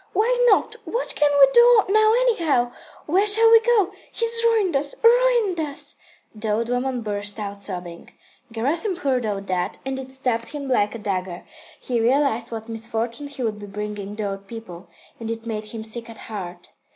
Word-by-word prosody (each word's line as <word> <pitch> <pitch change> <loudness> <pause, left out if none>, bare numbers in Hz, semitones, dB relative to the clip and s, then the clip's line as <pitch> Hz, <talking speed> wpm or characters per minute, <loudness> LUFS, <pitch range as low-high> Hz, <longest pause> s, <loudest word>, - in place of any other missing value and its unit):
Why 445 +6 +2
not? 405 - +3
What 485 - -2
can 295 - +3
we 275 - +9
do 475 -2 +7
now 435 +1 +4
anyhow? 320 - +1 0.3
Where 380 +7 +2
shall 450 +2 +6
we 455 - +9
go? 450 -5 +2 0.2
He's 460 0 +1
ruined 435 -8 +2
us, 285 +1 0
ruined 470 -6 +4
us." 295 -3 -1 0.4
The 215 0 -5
old 225 +3 0
woman 245 0 -1
burst 205 0 -4
out 200 -1 -6
sobbing. 180 -3 -7 0.4
Gerasim 305 - 0
heard 260 -8 -1
all 200 -2 -2
that, 185 -2 -3
and 265 0 -3
it 260 0 -8
stabbed 250 -2 -2
him 285 -2 -5
like 210 -4 +1
a - - -4
dagger. 185 -4 -4 0.3
He 240 -3 -2
realised 240 -1 +1
what 220 -1 -6
misfortune 225 +3 -4
he 280 -3 -7
would 215 -2 -2
be 205 - -9
bringing 205 0 -6
the 210 -1 -3
old 195 0 -6
people, 205 -6 -10 0.3
and 225 -1 -6
it 230 0 -5
made 215 -2 -4
him 220 +1 -7
sick 230 +1 -5
at 225 - -10
heart. 180 -5 -8
235 Hz, 185 wpm, -22 LUFS, 210-340 Hz, 0.4 s, we